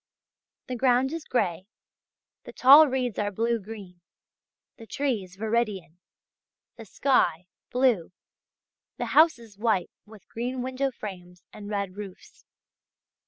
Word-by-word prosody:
The 255 - -5
ground 255 +3 +2
is 330 -2 -5
grey, 190 -6 -1 0.8
the - - -10
tall 285 +4 +8
reeds 255 -4 -2
are 205 -1 0
blue 230 +3 0
green, 195 -4 -11 0.8
the 225 - -12
trees 220 -11 -3
viridian, 210 -6 -2 0.8
the 225 - -11
sky 185 - +1 0.2
blue, 245 -10 +1 0.9
the - - -3
houses 235 -11 +3
white 215 -5 0 0.2
with 215 -2 -16
green 245 +2 -4
window 260 +2 -1
frames 180 -7 -10
and 205 -1 -9
red 200 -2 -3
roofs. 200 -3 -11
225 Hz, 120 wpm, -26 LUFS, 195-255 Hz, 0.9 s, tall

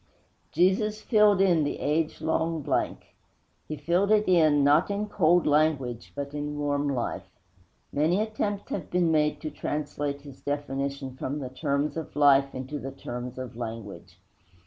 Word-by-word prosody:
Jesus 195 +5 +2
filled 210 -4 +4
in 175 -5 +4
the 145 - -2
age 155 +2 -1
long 160 -1 0
blank; - - -2 0.5
He 155 - -5
filled 175 +7 +1
it 215 0 +3
in, 155 -5 +4
not 145 +6 +4
in 200 +1 -1
cold 175 -3 +3
language, 145 -6 +1
but 140 0 -5
in 150 0 -4
warm 145 0 0
life. 125 -4 -3 0.6
Many 160 +6 +2
attempts 210 -2 -2
have 175 - -4
been 175 -2 +2
made 150 -1 +2
to 155 - -4
translate 145 -1 -3
His 140 -2 -13
definition 140 -2 -3
from 135 +2 -3
the 135 -4 -5
terms 140 +3 -1
of 160 - -6
life 140 -2 +4
into 130 +3 -5
the 135 0 -6
terms 125 -1 -7
of 130 -3 -6
language. 105 -7 -7
145 Hz, 155 wpm, -27 LUFS, 140-170 Hz, 0.6 s, filled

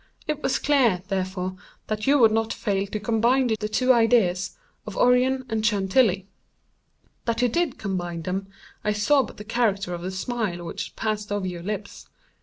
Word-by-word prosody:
It 300 -1 -2
was 265 - +1
clear, 240 -11 +2
therefore, 185 -1 -2 0.3
that 215 +1 -3
you 285 +1 +5
would 225 -5 +6
not 225 0 0
fail 200 -2 -1
to 215 +1 -4
combine 235 +4 +2
the 210 - -3
two 255 +4 +3
ideas 220 -6 +2 0.3
of 210 - -6
Orion 255 +1 +3
and 220 -2 -2
Chantilly. 200 -1 +2 1.0
That 230 0 0
you - - +5
did 335 +4 0
combine 175 -4 -3
them 190 +3 -3 0.4
I 210 - +1
saw 210 +8 +3
by 255 - -6
the 210 - -9
character 210 -5 0
of 170 - -5
the 180 - -3
smile 190 -2 -3
which 165 - -6
passed 210 -1 -2
over 205 -2 -1
your 175 -2 -4
lips. 200 +2 -6
210 Hz, 175 wpm, -25 LUFS, 190-240 Hz, 1.0 s, would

